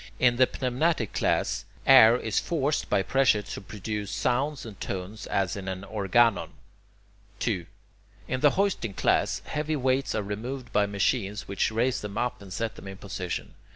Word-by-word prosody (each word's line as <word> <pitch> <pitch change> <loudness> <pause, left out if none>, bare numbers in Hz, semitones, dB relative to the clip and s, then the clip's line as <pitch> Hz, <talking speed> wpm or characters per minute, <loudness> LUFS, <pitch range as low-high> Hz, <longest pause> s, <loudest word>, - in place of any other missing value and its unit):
In 120 -1 +3
the 130 0 +5
pneumatic 130 - 0
class, - - 0 0.2
air 120 -3 +8
is 110 -4 0
forced 150 -3 -1
by 95 - +2
pressure 130 -5 +3
to 100 - -7
produce 105 +1 -5
sounds 135 +6 -1
and 105 -4 -10
tones 95 +3 -5
as 95 -3 0
in 95 -1 -6
an 95 0 -3
[Greek: 100 - -12
organon]. 110 +2 +2 0.8
2. - - -1 0.6
In 130 - -1
the 145 +1 +4
hoisting 190 - 0
class, - - +1
heavy 155 +1 -2
weights 130 0 0
are 110 - 0
removed 120 +6 -5
by 105 0 +3
machines 100 +1 -1
which 100 +2 0
raise 120 +3 0
them 105 0 -6
up 125 0 -1
and 100 -2 -11
set 115 +4 -3
them - - -10
in 95 0 -7
position. 95 -3 -5
110 Hz, 170 wpm, -27 LUFS, 100-130 Hz, 0.8 s, air